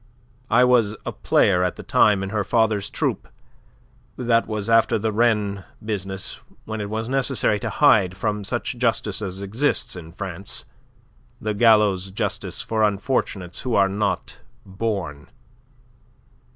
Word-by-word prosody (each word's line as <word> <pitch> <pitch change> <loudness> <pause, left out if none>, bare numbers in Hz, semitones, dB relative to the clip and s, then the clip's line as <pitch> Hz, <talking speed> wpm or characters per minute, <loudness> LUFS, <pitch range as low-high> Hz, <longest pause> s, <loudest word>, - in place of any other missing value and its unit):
I 125 +2 +5
was 120 -4 +3
a - - -2
player 90 0 +2
at 90 - -1
the - - -9
time 105 -2 +3
in 95 - -4
her 105 -2 0
father's 110 -3 +1
troupe. - - -2 0.9
That 115 -2 +2
was 110 -2 -3
after 115 -1 +4
the 110 +1 -1
Rennes 105 -3 +1 0.2
business, 95 -3 -4 0.2
when 110 -1 -4
it 100 - -4
was 110 +1 -3
necessary 130 -5 +1
to - - -3
hide 100 -11 +3
from 105 0 -2
such 120 +3 -3
justice 110 -4 0
as 95 -1 -5
exists 120 +3 0
in 80 -2 -9
France 95 +1 -5 0.7
the 110 0 -2
gallows' 105 -4 +4
justice 95 - -3
for 110 -1 -1
unfortunates 100 -4 -1
who 125 -2 -1
are 100 -1 +4
not 100 +1 -2 0.3
'born. 95 -7 -4
105 Hz, 140 wpm, -23 LUFS, 95-115 Hz, 0.9 s, I